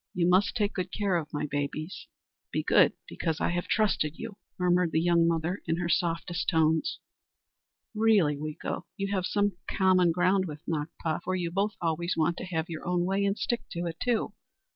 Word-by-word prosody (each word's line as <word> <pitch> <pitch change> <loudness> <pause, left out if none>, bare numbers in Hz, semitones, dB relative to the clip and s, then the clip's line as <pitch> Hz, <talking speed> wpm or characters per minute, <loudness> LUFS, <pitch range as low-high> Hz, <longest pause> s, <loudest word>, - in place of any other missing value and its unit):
You 175 -1 +2
must 190 +4 +3
take 210 -3 +1
good 185 -1 -3
care 200 -3 0
of 160 -3 -2
my 145 0 -2
babies. 145 +3 -4 0.4
Be - - -1
good, - - +5
because 160 -2 -2
I - - +1
have 175 0 -2
trusted 190 -8 +1
you," 225 -3 -7 0.2
murmured 180 -2 +2
the 160 - +3
young 170 0 +3
mother 170 +3 0
in 165 0 +1
her 175 -1 -2
softest 170 +1 0
tones. 160 -2 +2 1.0
"Really, 215 -9 +4
Weeko, 155 +4 -5
you 195 -1 -2
have 185 -2 0
some 205 -3 +1
common 185 -2 +4
ground 185 +3 +2
with 150 -1 -9
Nakpa, 160 +1 -2
for 185 +2 -2
you 175 -2 -2
both 200 +3 0
always 170 +1 -1
want 165 +2 +1
to - - -5
have 165 -3 -2
your 160 -2 -6
own 175 0 0
way, 195 +2 +1
and 200 +1 +1
stick 240 -1 -1
to 175 +1 -3
it, 165 -1 -4
too! 240 -3 0
175 Hz, 190 wpm, -28 LUFS, 160-190 Hz, 1.0 s, good